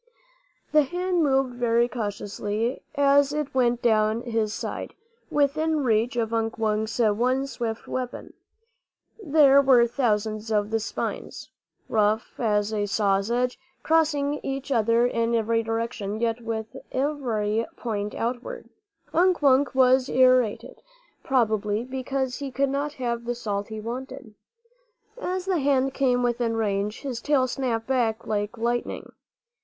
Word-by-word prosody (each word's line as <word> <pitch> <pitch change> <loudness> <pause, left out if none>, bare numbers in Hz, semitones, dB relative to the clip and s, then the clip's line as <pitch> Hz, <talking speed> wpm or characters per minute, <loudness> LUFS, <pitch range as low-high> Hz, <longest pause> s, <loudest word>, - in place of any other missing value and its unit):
The 305 - +6
hand 355 +4 -1
moved 270 -4 +2
very 235 0 +2
cautiously 210 +1 -3
as 280 0 +4
it 300 -1 -3
went 245 -2 +1
down 220 0 +2
his 225 -3 -1
side, - - -5 0.3
within 300 +1 +1
reach 230 +1 +1
of 230 -1 -1
Unk 225 0 -1
Wunk's 220 0 -1
one 245 +4 +2
swift 230 -4 -5
weapon. 255 -1 -5 0.9
There 285 -4 +6
were 260 -3 +5
thousands 220 -3 -1
of 210 0 +1
the 225 - +1
spines, 220 - -5 0.4
rough 215 +1 0
as 210 -2 +1
a 205 -1 -1
saw's 200 0 +1
edge, 250 +1 0 0.2
crossing 295 -3 +2
each 270 0 -4
other 230 0 +3
in 230 -1 0
every 230 0 +1
direction, 225 -2 -3
yet 230 0 -1
with 225 -1 -5 0.2
every 235 -6 -1
point 210 -3 -3
outward. 245 - -4 0.5
Unk 355 -2 +3
Wunk 270 -1 +4
was 260 0 +4
irritated, 255 -2 +2 0.4
probably, 220 -4 +1
because 260 0 -3
he 280 -1 -4
could 275 +2 0
not 285 +2 -2
have 235 -4 -3
the 240 0 -2
salt 205 -4 -3
he 220 -1 -6
wanted. 250 +1 -7 0.9
As 370 -2 -2
the 375 -3 +1
hand 270 -1 +2
came 250 -3 +1
within 240 -1 0
range, 210 0 -1
his 255 -4 -4
tail 280 -2 +2
snapped 245 -3 -2
back 240 -4 0
like 210 +1 -2
lightning. 240 +1 -2
240 Hz, 135 wpm, -25 LUFS, 220-270 Hz, 0.9 s, The